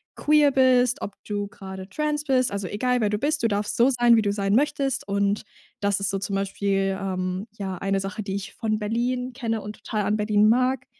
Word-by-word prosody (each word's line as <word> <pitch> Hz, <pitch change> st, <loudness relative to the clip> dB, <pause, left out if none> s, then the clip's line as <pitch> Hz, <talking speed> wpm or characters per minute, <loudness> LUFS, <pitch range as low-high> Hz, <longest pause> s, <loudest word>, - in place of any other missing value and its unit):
queer 295 Hz, -1 st, +4 dB
bist, 255 Hz, -1 st, +3 dB
ob 200 Hz, -, -5 dB
du 205 Hz, -1 st, -2 dB
grade 190 Hz, -3 st, -9 dB
trans 300 Hz, +5 st, -1 dB
bist. 260 Hz, -4 st, +2 dB
Also, 200 Hz, -2 st, -3 dB
egal, 250 Hz, +5 st, 0 dB
wer 210 Hz, -, +2 dB
du 210 Hz, -, 0 dB
bist, 300 Hz, +6 st, 0 dB
du 230 Hz, -, +3 dB
darfst 205 Hz, -1 st, -1 dB
so 240 Hz, +3 st, +5 dB
sein, 240 Hz, -2 st, +5 dB
wie 225 Hz, -, +4 dB
du 205 Hz, -1 st, 0 dB
sein 200 Hz, -1 st, 0 dB
möchtest 275 Hz, 0 st, +1 dB
und 200 Hz, +1 st, +1 dB, 0.4 s
das 200 Hz, -1 st, +1 dB
ist 195 Hz, 0 st, -1 dB
so 195 Hz, -, -1 dB
zum 195 Hz, 0 st, -3 dB
Beispiel, 195 Hz, 0 st, 0 dB
ähm, 185 Hz, +1 st, -3 dB
ja 190 Hz, -2 st, -4 dB
eine 195 Hz, 0 st, 0 dB
Sache, 195 Hz, +2 st, -4 dB
die 195 Hz, -2 st, -4 dB
ich 195 Hz, -1 st, -6 dB
von 215 Hz, -2 st, -1 dB
Berlin 245 Hz, +4 st, -1 dB
kenne 230 Hz, -4 st, -2 dB
und 210 Hz, +1 st, -7 dB
total 215 Hz, -1 st, -3 dB
an 210 Hz, +1 st, +1 dB
Berlin 210 Hz, 0 st, +3 dB
mag. 255 Hz, +2 st, +2 dB
210 Hz, 220 wpm, -24 LUFS, 200-250 Hz, 0.4 s, so